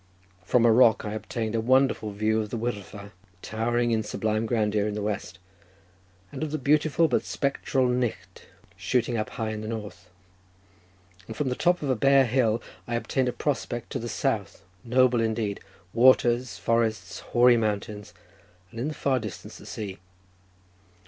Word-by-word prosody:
From 120 +5 +3
a 115 - +6
rock 115 -2 +5
I 105 - -4
obtained 110 +1 -4
a 115 - 0
wonderful 130 -2 +2
view 110 +2 0
of 105 - -5
the 120 - -4
Wyddfa 105 -3 -5 0.3
towering 120 +2 0
in 110 -1 +2
sublime 110 +1 -2
grandeur 105 -3 +1
in 105 - -3
the 105 - -3
west, 105 -3 -4 0.9
and - - -7
of 155 - -2
the 155 - -2
beautiful, 155 +3 +2
but 125 - +1
spectral, 135 -1 0
Knicht 115 -7 -3 0.3
shooting 125 -1 0
up 110 -1 -2
high 110 -1 -3
in 110 -1 -5
the 110 - -6
north; 105 -5 -7 1.2
and 110 - -8
from 145 - 0
the 125 - -1
top 175 +2 +1
of 140 - -2
a - - +2
bare 135 +3 +4
hill 115 -2 +1 0.2
I 120 - -2
obtained 125 +2 0
a - - -1
prospect 120 -4 -3
to - - -2
the 120 - -5
south, - - -2 0.2
noble 125 0 +3
indeed—waters, 110 +2 +1
forests, 110 -1 -1
hoary 120 0 +4
mountains, 105 -1 -3 0.6
and 115 - -8
in 125 - -1
the 155 - -4
far 135 -2 +1
distance 105 -5 -8
the - - -13
sea. 100 -4 -6
115 Hz, 165 wpm, -26 LUFS, 105-125 Hz, 1.2 s, a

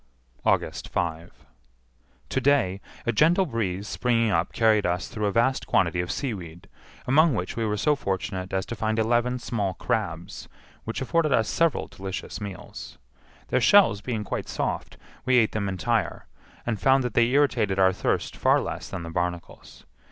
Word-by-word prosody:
August - - 0
5. 85 0 -4 0.8
To 135 - 0
day, 120 -9 +2 0.2
a 120 - +2
gentle 170 - +4
breeze 105 - -3
springing 115 -2 +1
up 85 -1 +1
carried 110 -2 +3
us 90 0 -1
through 105 -1 -2
a - - 0
vast 125 +5 +1
quantity 85 -1 +2
of 90 0 -4
seaweed, 90 - -5 0.4
among 150 +2 +4
which 90 -3 -3
we 115 - -1
were 105 -1 -1
so 150 +8 +2
fortunate 95 -4 -3
as 95 -1 -1
to 120 - -5
find 110 +1 -1
eleven 120 +3 +1
small 105 -6 -2
crabs, 90 -8 -3 0.4
which 115 - -4
afforded 155 +3 +1
us 115 -4 +3
several 165 -2 +1
delicious 95 +2 -6
meals. 100 -2 -8 0.5
Their - - +2
shells 190 - +5
being 110 -3 -3
quite 100 - -4
soft, - - -3 0.3
we 130 - +2
ate 110 -3 +4
them 100 -2 -2
entire, 95 -3 -1 0.4
and 110 -4 -2
found 135 0 +4
that 125 -3 -3
they 115 -1 +4
irritated 120 -7 +2
our 95 -1 +4
thirst - - -1
far - - +3
less - - -5
than 90 -3 -5
the 85 - -7
barnacles. 85 0 -5
110 Hz, 165 wpm, -25 LUFS, 95-125 Hz, 0.8 s, shells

